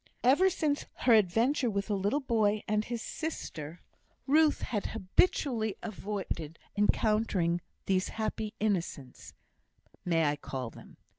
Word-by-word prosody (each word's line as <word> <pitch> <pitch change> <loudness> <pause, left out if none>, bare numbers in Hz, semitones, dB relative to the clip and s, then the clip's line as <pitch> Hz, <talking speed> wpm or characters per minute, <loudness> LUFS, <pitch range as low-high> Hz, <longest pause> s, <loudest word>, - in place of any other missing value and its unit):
Ever 285 +10 +5
since 305 -5 -1 0.2
her 245 - +7
adventure 225 +6 +3
with 200 -1 -1
the 210 - -1
little 205 +9 0
boy 215 -4 +1
and 210 0 +1
his 235 0 -4
sister, 170 - -5 0.4
Ruth 305 +2 +4
had 210 -4 -2
habitually 220 - +1
avoided 195 -7 -4 0.2
encountering 205 -4 +2 0.2
these 185 -1 +1
happy 220 0 -3
innocents, 175 -11 -3 0.7
may 165 -2 +2
I 145 0 +1
call 130 -5 -5
them? - - -14
210 Hz, 125 wpm, -30 LUFS, 185-240 Hz, 0.7 s, her